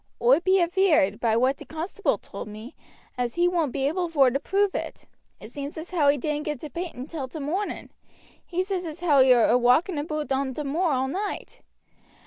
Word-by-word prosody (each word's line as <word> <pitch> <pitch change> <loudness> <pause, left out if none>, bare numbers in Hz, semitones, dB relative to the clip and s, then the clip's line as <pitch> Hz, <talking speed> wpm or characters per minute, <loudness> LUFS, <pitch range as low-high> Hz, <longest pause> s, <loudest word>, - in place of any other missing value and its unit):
"Oi 250 +5 +5
be 375 +2 +3
aveared, 345 - +2
by 225 -2 +2
what 260 +3 +2
t' - - -11
constable 345 +6 -2
told - - -9
me, 215 +4 -10 0.4
as 245 -1 -1
he 350 +1 +3
won't 335 -6 0
be 275 0 -1
able 350 +3 -1
vor 275 -6 +4
to 275 - 0
prove 395 +4 +1
it. - - -5 0.3
It - - -11
seems 285 +1 -6
as 320 +3 -7
how 310 -6 +3
he 285 - +3
didn't 300 +3 -3
get 300 -3 -3
to 305 - -7
Painton 335 -7 -5
till 295 -4 -5
t' 255 - -9
morning. 345 +9 -3 0.5
He 360 +1 -2
says 370 -2 -3
as 320 +2 -8
how 300 -6 +4
he 260 - +5
were 240 -3 +6
awalking 250 - +3
aboot 305 -1 -4
on 265 -1 -1
t' 300 - -3
moor 320 +5 0
all 265 -1 0
night. 395 +8 -5
300 Hz, 210 wpm, -25 LUFS, 265-350 Hz, 0.5 s, were